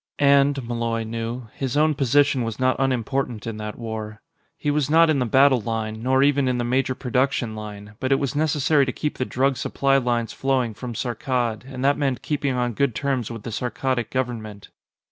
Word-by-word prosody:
And, 140 -2 +3
Malloy 115 -1 -1
knew, 115 +2 -5
his 135 0 -3
own 155 +1 +4
position 140 0 +3
was 115 0 -4
not 130 0 +2
unimportant 130 -3 -1
in 115 -2 -4
that 105 0 -6
war. 110 -2 -6 0.4
He 145 - -1
was 150 -1 0
not 165 +1 +5
in 145 - +1
the 125 - 0
battle 135 +1 +5
line, 110 0 -3
nor 130 +2 +3
even 140 -1 +3
in 125 -1 +1
the 120 - -1
major 130 +1 0
production 125 -2 0
line, 105 -1 -8
but 130 +1 -2
it - - +6
was 140 0 -2
necessary 150 -2 +2
to - - 0
keep 150 +3 -4
the 130 - 0
drug 135 +1 +1
supply 135 +3 +1
lines 120 -3 0
flowing 130 -4 0
from 120 +2 -7
Saarkkad, 120 -1 -2
and 130 0 -3
that 140 +1 +3
meant 135 -3 -1
keeping 145 -3 -1
on 125 -1 0
good 135 0 0
terms 130 -2 -1
with 115 -3 -7
the 115 - -5
Saarkkadic 125 +1 -2
government. 115 -5 -4
125 Hz, 200 wpm, -23 LUFS, 115-140 Hz, 0.4 s, it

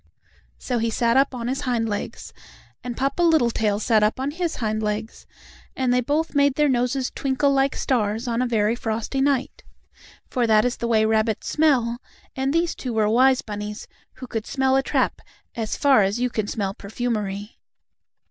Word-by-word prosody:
So 245 -2 -2
he 230 +1 0
sat 230 +1 +1
upon 265 -3 +1
his 270 +3 -2
hind 240 -4 0
legs, 205 -1 -5 0.5
and 245 -1 -5
Papa 275 +6 -1
Littletail 235 -11 +2
sat 220 -1 +3
up 210 +4 +1
on 270 +2 -1
his 340 +1 -2
hind 215 -2 -2
legs, 215 +1 -4 0.5
and 255 -2 +1
they 250 - +3
both 300 +6 -1
made 285 -2 +3
their 300 -1 +3
noses 255 0 0
twinkle 275 +1 +1
like 270 0 +2
stars 225 -1 -1
on 235 0 0
a 255 - +1
very 220 -1 +1
frosty 230 +3 -2
night. 275 -1 0 0.6
For 245 -2 0
that 215 0 +4
is 245 - -1
the 235 - -3
way 220 -2 +3
rabbits 220 0 0
smell, 250 -7 +2 0.4
and 265 +1 0
these 335 +2 +1
two 250 -3 -5
were 215 -1 +2
wise 255 +3 +4
bunnies, 210 0 -6 0.3
who 255 - -9
could 225 -3 -5
smell 265 -1 +1
a 270 - +4
trap - - -1 0.3
as 225 -2 -3
far 275 -6 +5
as 200 +4 0
you 250 0 0
can 215 -3 -2
smell 200 -2 -2
perfumery. 210 -1 -4
240 Hz, 180 wpm, -23 LUFS, 220-270 Hz, 0.6 s, far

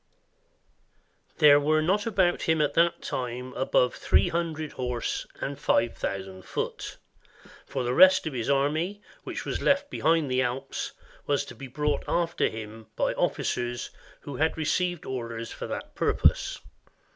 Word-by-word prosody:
] - - -41
There 145 -1 +9
were 155 +2 +2
not 200 +6 +1
about 190 -5 +2
him 160 -1 +2
at 150 -1 +2
that 170 0 +2
time 125 0 -4
above 125 -1 +2
three - - +2
hundred 160 -3 -2
horse, 125 -2 -3
and 140 0 -4
five 115 -4 +2
thousand 95 -1 -4
foot; - - -4 0.7
for 130 - -2
the 120 0 0
rest 185 +5 +7
of 160 - -3
his 120 0 -2
army, 155 +9 0 0.2
which - - -5
was - - -2
left 280 +1 +2
behind 160 -4 +2
the 130 0 +2
Alps, 130 +2 -3 0.3
was 145 0 +1
to - - -10
be 135 - -9
brought 150 +3 -1
after 170 0 +1
him 110 0 -8
by - - +1
officers 120 0 -1 0.3
who 140 -3 -7
had 160 +3 +1
received 175 +2 0
orders 115 -3 -5
for - - -6
that - - -6
purpose. - - +2
145 Hz, 155 wpm, -27 LUFS, 125-165 Hz, 0.7 s, There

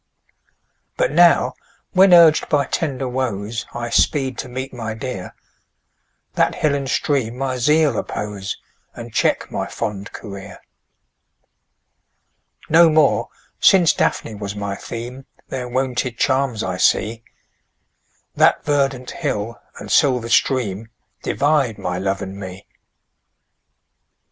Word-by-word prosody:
But - - +1
now, - - +5 0.4
when 190 0 +5
urg'd 170 -3 +6
by 145 -2 +2
tender 135 -4 -2
woes, 120 -3 -3
I 120 -1 -5
speed 135 -4 +2
to 130 - -5
meet 130 +2 -5
my 110 -3 -5
dear, 125 -6 -6 1.0
That - - +1
hill 150 -2 +1
and 140 -2 -2
stream 130 -6 0
my 130 -1 -2
zeal 150 +4 +3
oppose, 100 -2 -4 0.4
And 120 -1 -9
check - - 0
my - - -3
fond 100 -1 -5
career. 100 -3 -9 2.1
No 165 +1 +6
more, 155 -2 +3 0.3
since 180 -4 +5
Daphne 115 - -1
was 100 -1 -6
my 100 -1 -3
theme, 120 +6 -8 0.2
Their 125 -2 -4
wonted 125 -1 -2
charms 130 -5 +1
I 90 0 -3
see: 110 +4 +1 1.1
That - - +3
verdant 135 -3 0
hill, 115 -8 -3 0.2
and - - -8
silver 125 -4 +3
stream, 115 -5 +1 0.3
Divide 140 -6 +1
my 90 0 -3
love 95 +1 -1
and 95 +1 -7
me. 95 0 -8
125 Hz, 120 wpm, -20 LUFS, 105-140 Hz, 2.1 s, urg'd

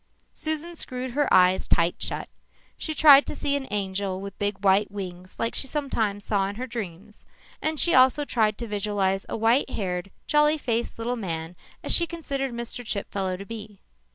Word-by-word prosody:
Susan 315 +2 -2
screwed 255 -4 -4
her 290 +2 0
eyes 185 +1 +5
tight 170 0 +3
shut. - - -3 0.5
She 315 - -4
tried 285 -3 +8
to - - -4
see 285 -1 0
an 275 -2 -3
angel 195 -1 -2
with 200 0 -7
big 205 -1 -2
white 195 +2 +4
wings 185 -2 -7
like 230 - -1
she 270 - 0
sometimes 225 -8 -2
saw 195 -2 +1
in 200 - -5
her 250 +4 -4
dreams 210 -4 -7 0.4
and 310 -1 -1
she 345 - +2
also 260 +3 +5
tried 220 -5 +1
to 235 - -5
visualize 200 -2 -1
a - - -2
white 230 +5 +3
haired, 180 -2 -3 0.2
jolly 300 +1 +4
faced 235 -5 -2
little 240 +2 -2
man 165 -4 -4 0.3
as - - +1
she 340 - +4
considered 275 -6 -3
Mr. 235 +1 -5
Chipfellow 195 -4 -3
to 195 - -8
be. 210 -2 -8
215 Hz, 180 wpm, -25 LUFS, 195-270 Hz, 0.5 s, tried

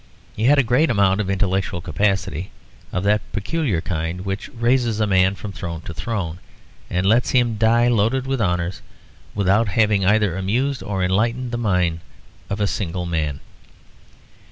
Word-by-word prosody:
He 110 - -1
had 145 +3 +5
a 140 - +5
great 125 +7 +2
amount 100 -3 +3
of 100 - -3
intellectual 95 -1 0
capacity, 95 -2 -1 0.4
of 90 - -2
that 105 +1 +3
peculiar 105 - -1
kind 85 +1 -3
which 95 +1 -4
raises 120 -1 +1
a 110 - +3
man 95 -1 +3
from 100 +2 -7
throne 85 -2 -6
to 85 - -8
throne 85 -1 -4 0.5
and 90 +1 -1
lets 115 +5 +3
him 120 -3 +2
die 115 +2 +3
loaded 120 +3 +1
with 135 -2 -1
honours 90 -2 -1 0.5
without 100 +3 +2
having 105 0 +2
either 105 -2 +3
amused 120 +8 -1
or 95 -2 -2
enlightened 115 +7 0
the 120 - -2
mind 90 -7 +1 0.5
of 100 - -3
a 105 - +2
single 90 -3 -3
man. 80 -4 -2
100 Hz, 160 wpm, -21 LUFS, 90-115 Hz, 0.5 s, had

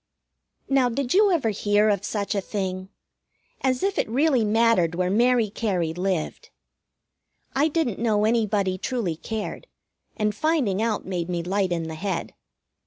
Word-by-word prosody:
Now, 270 -2 +3
did 250 +1 -2
you 405 +1 +5
ever 285 -11 +1
hear 205 +1 +2
of 200 -2 0
such 205 0 -2
a 200 - 0
thing? 190 -2 -4 0.7
As 255 -1 0
if 395 +1 0
it - - 0
really 265 0 +2
mattered 215 -6 +3
where 180 +1 0
Mary 235 0 +3
Cary 185 -8 -1
lived! 180 -2 -3 1.1
I 285 +3 +3
didn't 305 - -1
know 215 -2 +2
anybody 210 -4 +1
truly 225 -10 -2
cared, 220 - -5 0.5
and 210 0 0
finding 245 - 0
out 225 -2 -1
made 180 -2 -3
me 175 -1 -2
light 190 +1 0
in 170 -1 -1
the 160 0 -5
head. 175 +1 -3
210 Hz, 155 wpm, -24 LUFS, 185-245 Hz, 1.1 s, you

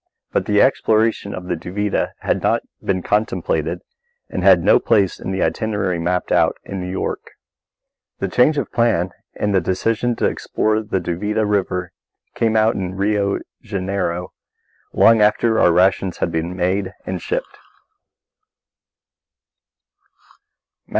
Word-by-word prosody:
But - - -1
the 105 -1 +4
exploration 110 -5 +1
of 90 - -7
the 90 - -2
Duvida 100 +5 -2
had - - 0
not - - +1 0.2
been 95 -2 -1
contemplated 110 - -1 0.5
and - - -2
had - - +6
no 485 -5 +5
place 100 - +1
in - - -5
the 95 0 -1
itinerary 95 +1 -1
mapped 90 +2 -1
out - - +3
in 95 -1 -6
New 90 - -5
York. 95 - -4 0.9
The 95 - -2
change 125 +10 +3
of 140 - -2
plan 100 -7 +1 0.2
and 105 -1 -1
the 95 - +3
decision 115 +5 0
to - - -1
explore 110 0 0
the 105 -3 -2
Duvida 105 +5 -1
River 90 -3 -1 0.4
came 115 -1 +1
about 110 +1 +3
in 95 -1 -4
Rio 100 0 0 0.2
Janeiro, 95 -2 -3 0.6
long 115 -1 +5
after 110 +2 +3
our - - +5
rations 95 +1 +2
had 85 - -1
been 85 +2 -2
made 95 +2 0
out - - -12
and 90 -1 -4
shipped. - - -4
100 Hz, 140 wpm, -20 LUFS, 90-110 Hz, 0.9 s, had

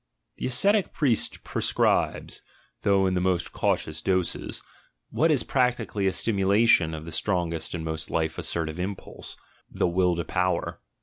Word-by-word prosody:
The - - -2
ascetic 200 - +3
priest 130 -7 0
pre - - -4
scribes, - - +1 0.4
though 100 -1 +3
in 95 - +1
the 90 - 0
most 90 -2 0
cautious 80 0 -1
doses, 95 -2 -1 0.5
what 165 - +2
is 150 -5 +2
prac 125 -2 +2
tically 100 -3 -2
a - - +3
stimulation 100 -5 +3
of 80 0 -8
the 85 - -8
strongest 85 -2 -1
and 80 -2 -5
most 80 -1 -4
life 80 -1 -1
assertive 80 0 -2
impulse 95 +2 -6 0.2
— - - -36
the - - 0
Will 90 0 +2
for 85 - -2
Power. 90 +1 -1
95 Hz, 165 wpm, -26 LUFS, 85-105 Hz, 0.5 s, ascetic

